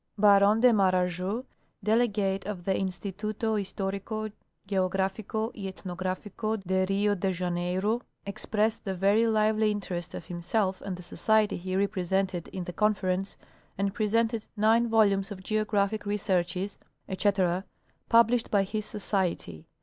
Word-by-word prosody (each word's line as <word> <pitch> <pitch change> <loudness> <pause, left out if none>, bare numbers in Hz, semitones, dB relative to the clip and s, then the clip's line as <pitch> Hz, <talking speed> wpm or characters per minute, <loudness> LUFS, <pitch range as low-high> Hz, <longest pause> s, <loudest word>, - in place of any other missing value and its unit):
Baron 205 +1 +5
de 250 - +7
Marajo, 185 +3 +1 0.4
delegate 205 -3 +1
of 195 -4 -5
the 195 - +2
Instituto 200 +4 -2
Historico 200 +2 -3 0.4
Geog 190 -2 0
rafico 215 +4 -1
y 195 -3 -5
Ethnografico 190 +4 -3
de 190 +1 +1
Rio 200 +1 +2
de 190 0 0
Janeiro, 180 +5 -1 0.2
expressed 215 +2 -1
the 190 -1 -3
very 200 +5 +3
lively 215 0 +3
interest 180 -5 -4
of - - -7
himself 185 +3 -1
and 190 -2 -4
the 180 - -10
society 215 +4 +2
he 185 +1 -4
represented 190 -2 0
in 185 - -5
the 180 - -6
Confer 210 -1 +1
ence, 190 +2 -3 0.4
and 200 0 0
i^resented 225 +1 0
nine 225 +3 +4
volumes 200 -3 +3
of 190 -3 -8
geographic 215 0 0
researches, 190 -1 -1 0.3
etc, 190 -2 +1 0.5
published 230 +1 +4
by 200 -2 +3
his 215 +2 -3
society. 185 - -2
200 Hz, 135 wpm, -28 LUFS, 185-215 Hz, 0.5 s, de